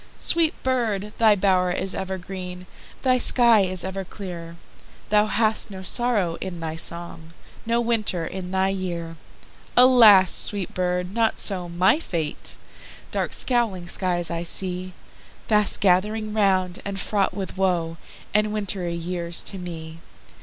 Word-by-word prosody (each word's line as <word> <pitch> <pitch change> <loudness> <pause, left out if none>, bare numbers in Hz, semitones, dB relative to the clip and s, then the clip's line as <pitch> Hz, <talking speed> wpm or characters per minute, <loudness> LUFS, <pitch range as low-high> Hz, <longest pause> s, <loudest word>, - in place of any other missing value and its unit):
Sweet 330 -2 +3
bird! 220 -6 -1
thy 220 -2 +5
bow'r 185 -2 +2
is 190 +2 -1
ever 190 0 -4
green, 180 0 -8 0.4
Thy 255 -1 +3
sky 235 -3 +4
is 185 -2 -1
ever 190 +1 -4
clear; 175 -3 -8 0.6
Thou 210 0 +4
hast 220 0 0
no 190 -2 -8
sorrow 205 -6 +1
in 180 -2 -5
thy 160 -1 -4
song, 165 0 -6 0.3
No 235 +1 +1
winter 220 -7 0
in 185 +1 -6
thy 190 +1 +1
year! 175 -4 -4 0.6
Alas! 230 -7 +7
sweet 200 -3 +3
bird! 180 0 -2
not 225 -1 +1
so 180 -4 -2
my 180 - +3
fate, 165 - -4 0.6
Dark - - -2
scowling 225 -8 0
skies 175 -1 0
I 170 0 -3
seeFast 185 +4 -1
gathering 210 +3 +1
round, 190 -4 +1
and 200 -1 -5
fraught 200 0 0
with 190 -3 -5
woeAnd 185 +3 -2
wintry 195 -5 -3
years 170 0 -3
to 195 - -6
me. 165 -2 -8
190 Hz, 135 wpm, -23 LUFS, 175-210 Hz, 0.6 s, Alas